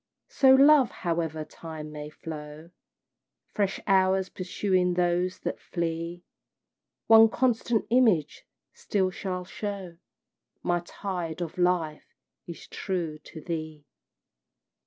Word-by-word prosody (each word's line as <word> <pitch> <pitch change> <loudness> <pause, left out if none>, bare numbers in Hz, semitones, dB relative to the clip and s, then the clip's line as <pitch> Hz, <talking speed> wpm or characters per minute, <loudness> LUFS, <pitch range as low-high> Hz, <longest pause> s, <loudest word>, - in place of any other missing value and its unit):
So, 265 -1 +6
love, 275 -1 +6
however 165 -3 -3
time 155 -2 -9
may 150 0 -7
flow, 155 +1 -9 0.8
Fresh 200 -2 0
hours 190 -1 +3
pursuing 185 -1 0
those 180 +1 +1
that - - -3
flee 170 0 -4 0.8
One 225 0 +8
constant 235 -2 +1
image 220 - +3 0.3
still 205 - -1
shall 180 -1 -4
show 195 -3 -6 0.7
My 175 0 +1
tide 175 -3 -5
of 175 0 -5
life 175 -4 0 0.3
is 170 - -9
true 170 -5 -4
to 155 - -11
thee! 155 -3 -5
180 Hz, 105 wpm, -27 LUFS, 165-195 Hz, 0.8 s, One